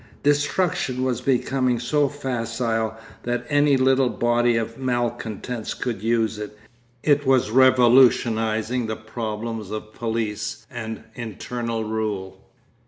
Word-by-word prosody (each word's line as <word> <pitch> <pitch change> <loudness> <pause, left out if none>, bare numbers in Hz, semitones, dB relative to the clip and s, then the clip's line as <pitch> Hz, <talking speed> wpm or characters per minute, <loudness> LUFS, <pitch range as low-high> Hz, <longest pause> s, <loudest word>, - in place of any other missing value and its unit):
Destruction 145 -2 +1
was 130 -3 -1
becoming 130 -1 +1
so 145 +4 +1
facile 115 -4 -2 0.2
that 120 0 -2
any 145 -1 +4
little 130 0 +3
body 120 0 +2
of 115 +2 -3
malcontents 120 -2 -3
could 115 -6 -3
use 115 -1 +1
it; 105 0 -7 0.5
it 145 -1 +3
was 130 -5 +3
revolutionising 120 -2 +4
the 110 - -2
problems 110 -1 -5
of 110 0 -6
police 110 -1 -3
and 110 -3 -6
internal 115 0 -4
rule. 105 -3 -3
120 Hz, 110 wpm, -23 LUFS, 110-130 Hz, 0.5 s, any